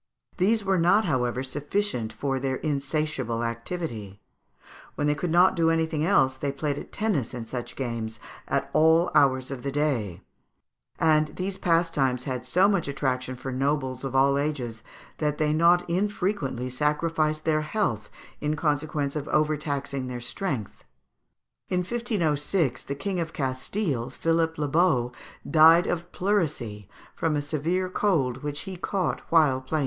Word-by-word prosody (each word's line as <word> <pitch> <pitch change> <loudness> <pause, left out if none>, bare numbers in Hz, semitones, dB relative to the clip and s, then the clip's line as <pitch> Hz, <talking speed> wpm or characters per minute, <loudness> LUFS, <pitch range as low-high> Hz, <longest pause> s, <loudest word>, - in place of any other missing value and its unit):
These 205 +3 +2
were 190 -2 +2
not, 200 +6 +4
however, 125 0 0
sufficient 145 - -2
for 135 +4 -2
their 130 0 -1
insatiable 140 -5 -2
activity; 115 - -4 0.8
when 145 - -1
they 150 - +3
could 160 +4 -3
not 175 +3 +5
do 165 -2 +3
anything 160 -2 +1
else, 135 -7 +4
they 140 +1 -3
played 145 +1 -2
at - - -10
tennis 165 - -1
and 115 -2 -6
such 120 0 -5
games 115 -3 -4 0.3
at 140 +1 -1
all 160 +2 +4
hours 135 -3 +3
of 135 -2 -5
the 140 - -3
day; 130 - -1 0.7
and 155 -1 +3
these 185 +1 -3
pastimes 165 -8 +1
had 125 -2 -4
so 185 +9 +4
much 195 -7 +1
attraction 130 -2 -2
for 130 +1 -6
nobles 130 -1 -1
of 135 -1 -4
all 140 +1 +4
ages 130 -7 -3 0.4
that 150 -1 0
they 150 -1 +1
not 170 +3 +4
unfrequently 180 - -1
sacrificed 155 +2 0
their 155 -1 +2
health 150 - -1 0.3
in 150 +1 -1
consequence 150 -1 -1
of 150 -1 -3
overtaxing 145 -3 -1
their 125 -1 -5
strength. 125 - -4 0.9
In 180 -1 +1
1506 170 - 0
the 140 - -3
King 190 +5 -3
of 165 -2 -3
Castile, 130 - -2
Philippe 165 0 0
le 150 - 0
Beau, 140 -6 +2 0.4
died 165 +2 +7
of 175 0 -3
pleurisy, 145 - -1 0.3
from 160 -2 0
a - - +1
severe 165 +5 -1
cold 165 -10 0
which 145 -1 -4
he 190 -2 -7
caught 185 -1 -2
while 150 -6 +4
playing 130 - -21
tennis. 155 - +1
150 Hz, 155 wpm, -26 LUFS, 130-170 Hz, 0.9 s, died